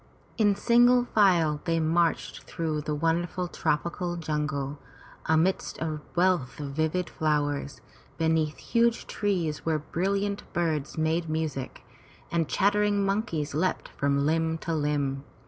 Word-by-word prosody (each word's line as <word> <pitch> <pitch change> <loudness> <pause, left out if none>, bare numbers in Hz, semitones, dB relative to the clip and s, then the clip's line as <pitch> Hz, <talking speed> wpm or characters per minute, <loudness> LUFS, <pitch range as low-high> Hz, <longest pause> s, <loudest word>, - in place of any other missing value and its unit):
In 205 -2 +4
single 245 +3 +4
file 170 -10 +3
they 165 -1 +1
marched 165 +1 +1
through 155 -2 -2
the 150 0 -2
wonderful 170 +3 0
tropical 175 +2 -1
jungle, 150 -3 -2 0.5
amidst 160 +4 +1
a 155 -2 -3
wealth 175 -7 +1
of 145 -2 -4
vivid 160 +5 0
flowers, 145 -3 -1 0.4
beneath 160 -1 +1
huge 235 0 +1
trees 175 -7 -1
where 160 -1 +1
brilliant 200 +6 -1
birds 160 -5 -1
made 160 +1 0
music, 155 -4 -3 0.5
and 165 -2 0
chattering 205 0 +2
monkeys 195 -8 -1
leapt 180 +5 -1
from 140 0 0
limb 160 +1 +1
to 165 +1 -3
limb. 145 -3 -1
160 Hz, 125 wpm, -27 LUFS, 150-185 Hz, 0.5 s, In